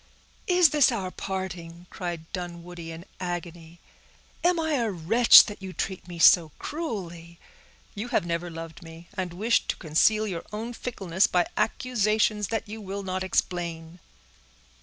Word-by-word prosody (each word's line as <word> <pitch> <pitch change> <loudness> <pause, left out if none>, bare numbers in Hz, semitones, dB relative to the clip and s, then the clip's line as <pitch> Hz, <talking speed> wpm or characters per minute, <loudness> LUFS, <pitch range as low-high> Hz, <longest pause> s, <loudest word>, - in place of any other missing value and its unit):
"Is 360 -4 +5
this 295 -3 +4
our 190 -6 -3
parting!" 175 -3 -6
cried 175 -3 -5
Dunwoodie, 175 -2 -7
in 165 +2 -9
agony. 175 -2 -6 0.6
"Am 350 0 +3
I 320 -1 -1
a 235 -5 +1
wretch, 205 +7 +7
that 205 -1 -8
you 190 -1 -7
treat 190 -1 -4
me 175 -1 -8
so 165 -1 +6
cruelly? 175 - -6 0.6
You 210 +4 -5
have 205 - 0
never 170 +1 -2
loved 165 +1 -8
me, 165 0 -12
and 185 -3 -3
wish 215 +7 +1
to - - -1
conceal 210 +7 +2
your 180 -5 -4
own 225 +3 -5
fickleness 195 -7 0
by 175 -1 +2
accusations 215 -3 +1
that 225 0 -3
you 215 +1 -7
will 200 0 -5
not 185 0 -3
explain." 170 -2 -2
185 Hz, 150 wpm, -26 LUFS, 170-215 Hz, 0.6 s, wretch